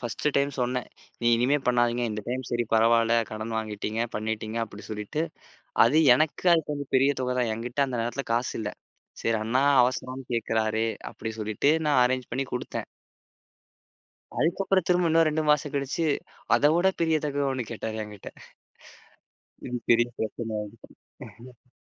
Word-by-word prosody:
1 120 +3 -4
time 140 0 +2
சொன்னேன். 125 0 -1 0.3
நீ 120 - -1
இனிமே 130 +5 +2
பண்ணாதீங்க. 120 -1 +2
இந்த 105 0 -4
டைம் 130 +1 -2
சரி 120 0 0
பரவாயில்ல 115 +1 +4 0.2
கடன் 110 +1 -4
வாங்கிட்டீங்க, 110 +1 -3
பண்ணிட்டீங்க 110 +1 -3
அப்படி 105 -1 -12
சொல்லிட்டு 105 +9 -3 0.6
அது 130 +7 +4 0.2
எனக்கு 155 +6 0
அது 165 - +2
கொஞ்சம் 145 -2 -5
பெரிய 135 +2 +4
தொகைதான். 125 -2 0
என்கிட்ட 120 +5 -1
அந்த 125 -3 -3
நேரத்துல 120 +3 -3
காசு 120 +2 0
இல்ல. 105 -1 -3 0.5
சரி 115 -1 +1
அண்ணா 125 +4 +1 0.2
அவசரம்னு 130 +1 -2
கேக்குறாரே 110 -1 0 0.3
அப்படி 110 - -5
சொல்லிட்டு 110 +7 +1 0.2
நான் 145 -4 +4
அரேஞ்ச் 130 0 -1
பண்ணி 135 +3 -1
கொடுத்தேன். 125 - -4 1.5
அதுக்கப்புறம் 185 +2 +1
திரும்ப 175 -1 +3
இன்னொரு 165 0 +4
2 155 +1 0
மாசம் 150 -1 +1
கழிச்சு 140 +4 -1 0.5
அதவிட 170 +6 +4
பெரிய 160 -1 +3
தொகை 145 -1 -1
ஒண்ணு 125 -4 -3
கேட்டாரு 110 0 -4
என்கிட்ட. 105 -2 -10 1.4
இது 125 - -3 0.2
பெரிய 120 0 +4
பிரச்சன 110 0 -3
ஆயிடுச்சு. 115 +3 -13
125 Hz, 145 wpm, -26 LUFS, 110-140 Hz, 1.5 s, பரவாயில்ல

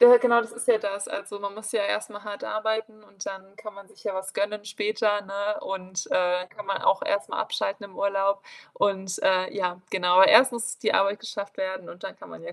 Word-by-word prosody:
Ja, 485 - +11
ja, - - +12
genau, 235 - +5
das 230 - -9
ist 235 +1 -6
ja 240 - +7
das. 200 -1 -3
Also, 200 0 -6
man 200 0 -5
muss 220 +1 -7
ja 220 -3 +1
erst 210 +2 -1
mal 205 -1 -9
hart 205 -1 -7
arbeiten 220 0 -2
und 195 -2 -10
dann 195 +1 -8
kann 215 0 -9
man 200 0 -13
sich - - -19
ja 205 - -1
was 190 0 -5
gönnen 205 +1 -2
später, 210 0 0
ne? 200 +1 -3
Und, 190 0 -4
äh, 180 0 +2
kann 210 +2 -10
man 195 - -2
auch 195 - +3
erst 200 - -1
mal - - -3
abschalten 200 +1 -2
im 195 -2 -12
Urlaub. 195 0 +1 0.3
Und, 190 -2 0
äh, 185 -1 +3
ja, 180 -2 -1
genau, 180 0 +5
erst 255 +6 +8
muss 240 0 -3
die - - +1
Arbeit 195 +1 +2
geschafft 200 -3 -6
werden 190 -1 -4
und 175 - -11
dann 195 - -5
kann - - -12
man - - -11
ja - - -8
200 Hz, 240 wpm, -26 LUFS, 190-215 Hz, 0.3 s, ja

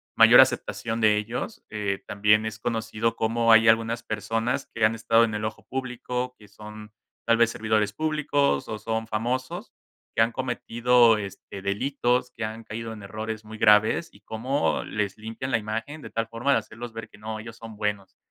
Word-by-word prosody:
mayor - - +9
aceptación 115 0 0
de 110 -1 +4
ellos. 115 - -4
Eh, 100 -2 -3
también 105 +1 +3
es 110 0 -5
conocido 115 -1 -1
cómo 115 +1 +3
hay 115 0 +7
algunas 115 +1 +2
personas 115 +2 -2
que 115 - -1
han 110 - +3
estado 115 +1 +3
en 110 -2 0
el 105 0 -2
ojo 110 - -6
público, 125 -1 -4
que 105 -1 -17
son 105 +1 -11 0.3
tal 115 0 +4
vez 115 -1 +4
servidores 110 -2 0
públicos 150 - 0
o 110 - -4
son 110 0 -3
famosos, 120 +4 -3 0.4
que - - +2
han 115 +1 +2
cometido, 120 -2 +3
este, 100 -1 -8
delitos, 125 +4 0
que - - -5
han 110 +1 -5
caído 115 +1 -6
en 110 -2 -9
errores 110 +2 -6
muy 110 0 -9
graves, 110 +10 +4
y 100 - -19
cómo 125 +7 -1
les 105 -2 -3
limpian 115 +4 -6
la 115 - +3
imagen 115 +8 -5
de - - -9
tal 115 0 -2
forma 115 +5 -1
de - - +5
hacerlos 120 +1 -9
ver 115 0 -7
que - - -17
no, 110 +1 -6
ellos 115 +1 -9
son 115 -2 -11
buenos. 105 -2 -3
115 Hz, 185 wpm, -26 LUFS, 110-120 Hz, 0.4 s, mayor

